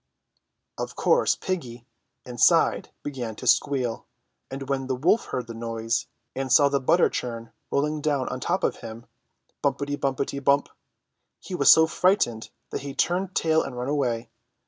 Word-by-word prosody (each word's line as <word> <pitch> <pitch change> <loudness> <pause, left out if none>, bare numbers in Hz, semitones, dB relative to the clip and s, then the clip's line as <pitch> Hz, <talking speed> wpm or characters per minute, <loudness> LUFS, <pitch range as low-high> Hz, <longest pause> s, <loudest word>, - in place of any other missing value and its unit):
Of - - -4
course - - +3
piggy, 125 - -5 0.4
inside, 120 -2 +3
began 125 -6 -5
to - - -9
squeal, 125 -1 +1 0.4
and 135 0 -6
when 135 -1 -2
the 130 - -1
wolf 170 - +2
heard 125 - -4
the 115 - -8
noise, 115 0 -2 0.3
and 135 -1 -3
saw 140 +2 +6
the 140 0 +1
butter 170 +7 +3
churn 115 -2 -5 0.2
rolling 150 +2 0
down 145 -3 0
on - - -4
top - - -1
of - - 0
him 115 +1 -9 0.3
— - - -46
Bumpety, 145 0 -1
bumpety, 140 0 -2
bump! 140 +1 +3 0.4
— - - -55
he - - -7
was 140 -6 +6
so 160 - +7
frightened 160 - +1 0.2
that - - -3
he 140 0 -7
turned 185 +2 0
tail 160 -1 +2
and 125 -3 -6
ran 125 +2 -3
away. 120 -5 -1
135 Hz, 170 wpm, -25 LUFS, 120-145 Hz, 0.4 s, so